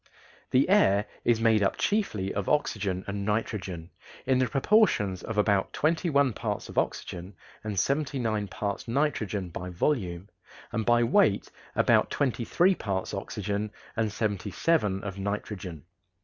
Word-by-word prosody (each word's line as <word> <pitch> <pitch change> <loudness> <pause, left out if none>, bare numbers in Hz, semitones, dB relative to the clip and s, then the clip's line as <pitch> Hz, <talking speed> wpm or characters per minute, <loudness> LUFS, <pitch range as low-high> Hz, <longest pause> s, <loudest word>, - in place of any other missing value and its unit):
The 130 +2 +3
air 105 - +4 0.2
is 120 -2 +3
made 110 -2 +4
up 100 - +1
chiefly 155 - 0
of 100 -2 -2
oxygen 100 -10 0
and 100 0 -3
nitrogen, 95 -5 -3 0.3
in 130 -1 +3
the 130 - +2
proportions 135 - +2
of 115 - -5
about 100 -2 +2
twenty 165 +3 +1
one 140 -4 +3
parts - - -4
of - - -10
oxygen 90 +3 -4 0.3
and 105 -2 -4
seventy 140 +7 0
nine 110 -4 -1
parts 100 +3 -4
nitrogen 110 -8 -1
by 90 +2 -6
volume, 90 - -1 0.4
and 110 0 -2
by 120 0 +5
weight 120 - +3 0.2
about - - +4
twenty 125 -4 -1
three 185 +9 +4
parts 100 - -3
oxygen 105 +1 -3 0.3
and 110 -2 0
seventy 105 -2 -2
seven 100 - +1
of 100 -1 -5
nitrogen. 95 -5 -4
105 Hz, 150 wpm, -28 LUFS, 95-130 Hz, 0.4 s, by